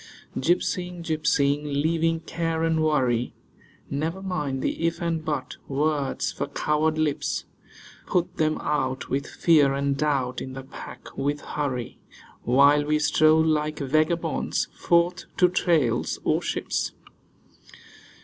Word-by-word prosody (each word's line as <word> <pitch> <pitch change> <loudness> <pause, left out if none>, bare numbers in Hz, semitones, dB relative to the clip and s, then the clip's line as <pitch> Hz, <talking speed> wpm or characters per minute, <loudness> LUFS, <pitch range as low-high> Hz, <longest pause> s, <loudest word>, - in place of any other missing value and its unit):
Gypsying, 175 +3 0
gypsying, 150 -3 +1
leaving 160 +3 0
care 165 -1 -2
and 165 -1 +2
worry: 125 -6 +1 0.5
Never 160 +7 -3
mind 150 -8 -2
the 165 - 0
'if' 165 - -2
and 165 -2 -1
'but' 145 -5 -3
(words 145 0 0
for - - -4
coward 155 +1 0
lips). 155 -2 -1 0.6
Put 175 -1 0
them 155 -1 +1
out 130 -3 -1
with 140 +1 -1
'fear' 145 -5 +3
and 140 0 0
'doubt,' 135 -4 0
in 130 - -6
the 135 0 -7
pack 135 - -11
with 145 +1 -1
'hurry,' 130 -5 -4 0.4
While 140 +4 +5
we 150 +1 +2
stroll 155 +1 +4
like 155 -1 0
vagabonds 155 +4 0
forth 175 +1 +1
to 180 - +6
trails, 160 -10 +1
or - - +2
ships. - - -2
150 Hz, 125 wpm, -25 LUFS, 140-165 Hz, 0.6 s, to